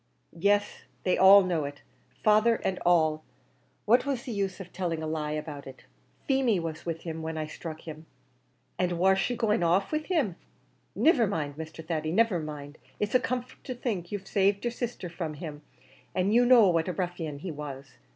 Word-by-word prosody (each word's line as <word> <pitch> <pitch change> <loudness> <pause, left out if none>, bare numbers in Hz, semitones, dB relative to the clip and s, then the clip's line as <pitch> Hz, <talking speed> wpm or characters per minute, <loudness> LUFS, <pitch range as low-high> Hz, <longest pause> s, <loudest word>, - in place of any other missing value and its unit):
"Yes, 205 +4 +1 0.2
they 185 - +2
all 195 +1 +8
know 175 -4 0
it 140 0 -8 0.4
father 215 +2 +5
and 190 -4 -2
all; 155 -3 +3 0.6
what 240 +4 +5
was 270 -3 -2
the 260 - -6
use 195 -3 -2
of 180 -2 -10
telling 170 -3 -2
a - - -2
lie 155 -1 -2
about? 150 -2 -6 0.6
Feemy 265 -7 +2
was 165 0 -5
with 165 -1 -3
him 160 -1 -5
when 160 0 -4
I 155 - -2
struck 155 +1 -8
him." 160 0 -9 0.7
"And 180 -1 +1
war 190 +3 +4
she 245 +6 0
going 220 -4 +1
off 175 +3 +2
with 305 0 -1
him? 275 - 0 0.6
Niver 265 -9 +4
mind, 150 -7 -3
Mr. 160 +1 -8
Thady, 155 -1 -2
niver 215 -1 +3
mind; 150 -1 -7 0.2
it's 210 0 -1
a 255 - +6
comfort 250 0 -4
to 255 - -5
think 205 -8 -3
you've 205 -2 -4
saved 200 +2 +1
your 240 - +1
sisther 240 -5 -4
from 165 -3 -5
him, 150 -1 -7 0.5
an' 185 +2 +1
you 240 +2 +5
know 240 -5 +7
what 165 -1 +1
a 180 - -1
ruffian 175 -5 -3
he 170 +5 -6
was. 140 -4 -8
180 Hz, 190 wpm, -28 LUFS, 160-210 Hz, 0.7 s, all